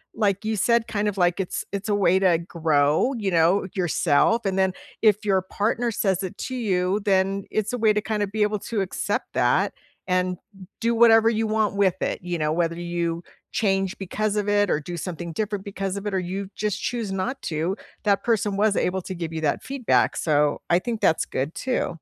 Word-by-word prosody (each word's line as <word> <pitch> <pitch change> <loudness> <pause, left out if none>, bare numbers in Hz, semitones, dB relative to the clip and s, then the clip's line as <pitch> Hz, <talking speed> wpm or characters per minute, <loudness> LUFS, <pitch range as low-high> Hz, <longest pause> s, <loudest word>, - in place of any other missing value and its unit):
like 200 -2 +1
you 220 0 0
said, 235 +3 +2
kind 210 -1 -1
of, 200 -1 -2
like, 175 +1 +2
it's 185 - -3
it's 200 +2 -4
a 205 - +3
way 190 -2 +3
to 180 -3 +4
grow, 160 - +1
you 200 -3 -1
know, 175 +4 +3
yourself, 180 +4 +2
and 190 0 0
then 190 -1 +2 0.3
if 215 -1 +4
your 190 -2 +3
partner 230 +5 -1
says 195 -3 0
it 185 - -6
to 255 - -4
you, 190 -4 0
then 195 0 +1
it's 215 +1 -1
a - - 0
way 220 -2 +3
to 210 - 0
kinda 210 -1 -1
be 210 +1 0
able 210 0 0
to 215 -1 -2
accept 190 - -2
that, - - +2 0.3
and 180 0 0 0.4
do 235 +1 +2
whatever 225 -1 +6
you 225 -1 0
want 215 -2 +1
with 190 -3 +2
it, - - -2
you 175 -1 -3
know. 155 -1 0
Whether 170 0 0
you 170 -1 -2 0.3
change 195 -3 0
because 210 +2 -2
of 205 0 0
it 205 -1 +3
or 150 - +2
do 170 +3 -6
something 170 0 -5
different 205 -1 -2
because 195 -1 -3
of 205 +1 -5
it, 200 - -3
or 190 - +1
you 190 +2 -4
just 210 -1 -2
choose 230 -5 -2
not 240 +8 -2
to, 170 +5 -2 0.3
that 200 -2 +2
person 215 -4 +1
was 210 0 +3
able 185 +1 0
to 190 - -5
give 165 -2 -4
you 160 - -3
that 145 -2 0
feedback, 265 -2 +1
so, 150 -2 +2
I 175 - +5
think 230 +1 -4
that's 160 - +3
good 140 +5 -3
too. 255 -1 -1
195 Hz, 215 wpm, -24 LUFS, 175-215 Hz, 0.4 s, whatever